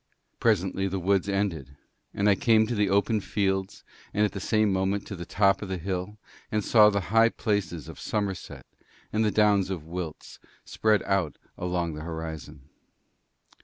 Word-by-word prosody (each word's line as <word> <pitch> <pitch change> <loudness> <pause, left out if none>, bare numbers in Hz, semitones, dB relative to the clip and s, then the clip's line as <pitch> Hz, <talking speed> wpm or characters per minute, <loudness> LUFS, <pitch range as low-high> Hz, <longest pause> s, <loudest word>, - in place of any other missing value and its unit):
Presently 95 -3 +1
the 95 0 -2
woods 95 +2 +1
ended, 85 -9 -2 0.3
and 100 - 0
I 100 - +6
came 110 +2 +3
to 120 - -3
the 105 -3 +1
open 100 +3 +2
fields 95 0 -2 0.3
and 105 +1 +4
at 105 - -2
the 100 - -6
same 110 0 +2
moment 95 +1 0
to 100 - -6
the 85 -1 -8
top 100 -1 +2
of 100 - -6
the 95 - -2
hill, 95 +3 -4 0.3
and 105 -1 0
saw 105 -2 +7
the 100 -2 -2
high 115 0 +6
places 100 - -2
of - - -10
Somerset 100 -4 -4 0.5
and 110 +1 +2
the 105 - +3
downs 105 -2 +3
of 90 -5 -4
Wilts 85 -1 -7 0.3
spread 110 -1 +1
out 95 -8 0 0.2
along 90 -2 -2
the 75 - -7
horizon. 80 -4 -7
100 Hz, 170 wpm, -27 LUFS, 90-105 Hz, 0.5 s, saw